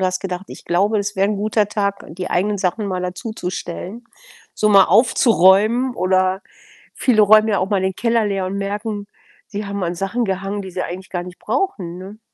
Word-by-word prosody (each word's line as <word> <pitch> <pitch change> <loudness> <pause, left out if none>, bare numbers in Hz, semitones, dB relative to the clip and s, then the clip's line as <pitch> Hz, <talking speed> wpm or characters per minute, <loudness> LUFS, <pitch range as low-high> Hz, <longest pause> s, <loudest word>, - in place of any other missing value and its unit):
du 190 - +2
hast 185 0 -2
gedacht: 185 0 -4
„Ich - - -11
glaube, 200 +5 +1
es 205 0 -3
wäre 195 +1 +2
ein 210 - -1
guter 210 0 +1
Tag, 200 -1 -2
die 180 +2 -6
eigenen 205 +3 0
Sachen 195 +3 -1
mal 185 -2 -2
dazu 180 +5 -5
zu 180 -4 -4
stellen, 185 +6 -6 0.5
so 215 - +1
mal 200 -2 +7
aufzuräumen“, 225 +3 +4
oder 185 0 +1 0.5
viele 225 -5 +3
räumen 215 +1 +6
ja 205 -3 +1
auch 185 +2 -2
mal 200 -2 +2
den 190 0 -1
Keller 230 -2 +1
leer 195 -2 -1
und 195 +2 -3
merken, 205 +1 -4 0.4
sie 210 0 -5
haben 200 0 -4
an 175 0 -1
Sachen 195 +6 -1
gehangen, 195 0 -3
die 190 - -8
sie 185 0 -3
eigentlich 185 +2 -7
gar 175 -2 -3
nicht 180 0 -11
brauchen, 210 - -2
ne? 195 +4 -10
200 Hz, 210 wpm, -20 LUFS, 185-215 Hz, 0.5 s, mal